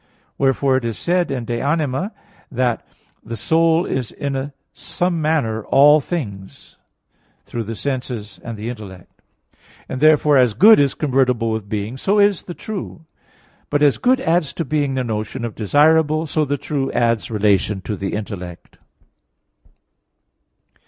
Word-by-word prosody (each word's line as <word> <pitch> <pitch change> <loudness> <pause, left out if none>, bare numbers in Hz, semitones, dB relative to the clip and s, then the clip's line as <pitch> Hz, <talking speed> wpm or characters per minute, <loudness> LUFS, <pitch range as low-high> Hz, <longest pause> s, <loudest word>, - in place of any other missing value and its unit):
Wherefore 135 0 +2
it 130 - -3
is 115 -3 -3
said 175 0 0
in 125 -4 -3
De 120 0 -3
Anima 145 -1 0
iii 195 - -3 0.4
that 125 -2 -1 0.4
"the 115 +1 -6
soul 165 - +2
is 125 -4 -3
in 140 0 -4 0.2
some 175 -2 -2
manner 140 -9 0
all 145 +2 +6
things," 105 - -6 0.7
through 115 -2 -5
the 115 +2 -5
senses 125 -5 -5
and 115 -2 -6
the 105 +2 -6
intellect. 100 -7 -10 0.7
And 130 - -5
therefore, 150 -2 +5
as 125 -4 +3
good 215 +3 +7
is 140 -2 +2
convertible 125 -5 +1
with 110 -2 -4
being, 105 +4 -3
so 195 +9 +1
is 205 -2 +3
the 175 - -9
true. 190 -6 -7 0.6
But 145 0 +1
as 145 -2 +3
good 255 +1 +3
adds 165 -2 +1
to 165 - -3
being 145 -2 -1
the 130 - -1
notion 115 +2 -4
of 115 - -5
desirable, 155 +7 +3
so 155 0 0
the 145 +1 -1
true 135 0 -3
adds 115 -2 +1
relation 105 -2 +1
to 105 - -4
the 95 0 -4
intellect. 90 -5 -8
135 Hz, 150 wpm, -20 LUFS, 110-155 Hz, 0.7 s, good